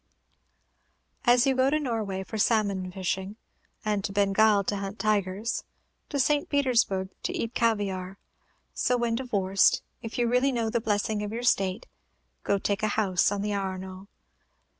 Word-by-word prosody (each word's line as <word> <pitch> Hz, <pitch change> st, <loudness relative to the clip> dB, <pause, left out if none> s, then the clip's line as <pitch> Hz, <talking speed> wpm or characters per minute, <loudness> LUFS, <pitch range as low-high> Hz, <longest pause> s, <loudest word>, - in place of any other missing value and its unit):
As 240 Hz, +1 st, +5 dB
you 270 Hz, -, +3 dB
go 260 Hz, +1 st, +3 dB
to 305 Hz, +2 st, +1 dB
Norway 220 Hz, -8 st, -2 dB
for 220 Hz, +3 st, -6 dB
salmon 200 Hz, -4 st, +1 dB
fishing, 190 Hz, +1 st, -3 dB, 0.5 s
to 205 Hz, -2 st, -1 dB
Bengal 200 Hz, +1 st, +3 dB
to 205 Hz, +1 st, -2 dB
hunt 195 Hz, +1 st, -5 dB
tigers, 205 Hz, +1 st, -1 dB, 0.5 s
to 290 Hz, -, -2 dB
St. 290 Hz, +2 st, +2 dB
Petersburg 240 Hz, -9 st, +1 dB
to -, -, -3 dB
eat 230 Hz, +1 st, -3 dB
caviare, 195 Hz, -5 st, -1 dB, 0.6 s
so 250 Hz, 0 st, +1 dB
when 235 Hz, -1 st, 0 dB
divorced, 200 Hz, -6 st, +2 dB, 0.2 s
if 225 Hz, -, -6 dB
you 240 Hz, -1 st, +2 dB
really 250 Hz, +3 st, +2 dB
know 230 Hz, -3 st, -1 dB
the 235 Hz, -, 0 dB
blessing 210 Hz, 0 st, 0 dB
of 210 Hz, 0 st, -4 dB
your 235 Hz, +2 st, -4 dB
state, 195 Hz, -2 st, +1 dB, 0.6 s
go 200 Hz, -, +1 dB
take 200 Hz, 0 st, -1 dB
a 215 Hz, -, +1 dB
house 190 Hz, -3 st, +2 dB
on 200 Hz, 0 st, -2 dB
the 210 Hz, 0 st, -1 dB
Arno. 190 Hz, -1 st, -5 dB
210 Hz, 155 wpm, -27 LUFS, 195-235 Hz, 0.6 s, As